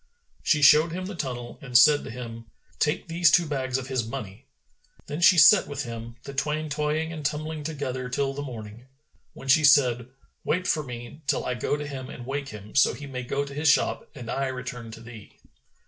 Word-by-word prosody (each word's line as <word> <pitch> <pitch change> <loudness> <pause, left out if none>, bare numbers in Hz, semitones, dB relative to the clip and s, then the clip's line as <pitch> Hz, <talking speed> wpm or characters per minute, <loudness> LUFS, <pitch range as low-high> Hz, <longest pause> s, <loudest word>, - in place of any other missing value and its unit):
She 150 -2 +2
showed 155 +4 +6
him 185 +1 -4
the 200 - -6
tunnel 125 -7 -5
and 125 -3 +2
said 150 +3 +6
to - - -8
him, 115 -1 -8 0.3
"Take 150 +3 0
these 165 -1 +3
two 175 +4 +4
bags 130 -4 -2
of 135 - -5
his 130 -2 -1
money." 115 0 -8 0.6
Then 150 +4 -5
she 180 +1 +7
sat 180 +7 +7
with 140 -1 -4
him, 115 -1 -7
the 140 - -8
twain 150 +3 -2
toying 150 +2 -1
and 155 -2 -7
tumbling 155 +2 -3
together 135 -4 -4
till 135 +2 -1
the 140 - -5
morning, 115 -3 -9 0.5
when 135 - -11
she 145 +4 +5
said, 125 -4 +4 0.4
"Wait 180 +2 0
for 155 - +1
me, 125 +1 -9
till - - 0
I 125 - -1
go 125 +4 -1
to 150 - -5
him 135 -2 -7
and 120 - -9
wake 140 +1 -4
him, 105 -2 -10
so 135 - +4
he 145 - -9
may 130 -2 -5
go 140 +3 -2
to 140 - -9
his 150 +2 +1
shop, 145 - +1
and 120 -5 -7
I 135 0 -1
return 125 -2 -6
to 115 - -11
thee." 115 -2 -13
135 Hz, 210 wpm, -26 LUFS, 125-150 Hz, 0.6 s, she